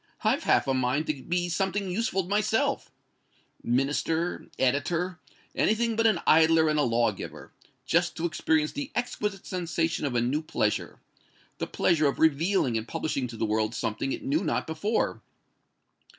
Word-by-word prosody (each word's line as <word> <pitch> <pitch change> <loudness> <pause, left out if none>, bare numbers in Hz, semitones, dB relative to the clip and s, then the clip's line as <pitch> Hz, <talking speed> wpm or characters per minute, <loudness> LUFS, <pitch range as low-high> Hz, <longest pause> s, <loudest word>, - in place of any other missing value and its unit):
"I've - - +1
half - - +3
a 135 - +2
mind 130 +4 0
to 150 -4 -3
be 175 0 -1
something 190 +2 -1
useful 195 -1 0
myself 210 +4 0 0.7
Minister 145 +7 0
editor 165 +7 0 0.3
anything 230 +1 +1
but 225 +1 +3
an 210 -6 +2
idler 160 0 +5
and 150 0 +1
a - - +4
law 120 -3 +2
giver 100 - -9 0.3
just - - +1
to 165 - -2
experience 155 -1 +1
the 285 -1 -5
exquisite 210 -5 -2
sensation 165 -4 -1
of 125 - -3
a - - +3
new 130 +6 0
pleasure 110 -8 -2 0.6
the - - -2
pleasure 155 -4 +2
of 140 - -1
revealing 160 - +2
and 110 - -8
publishing 140 -5 -2
to 115 -1 -9
the 110 - 0
world 110 +1 0
something 115 +4 -2
it - - -4
knew 155 +7 +1
not 160 - -1
before. 200 +8 -1
160 Hz, 160 wpm, -27 LUFS, 135-185 Hz, 0.7 s, idler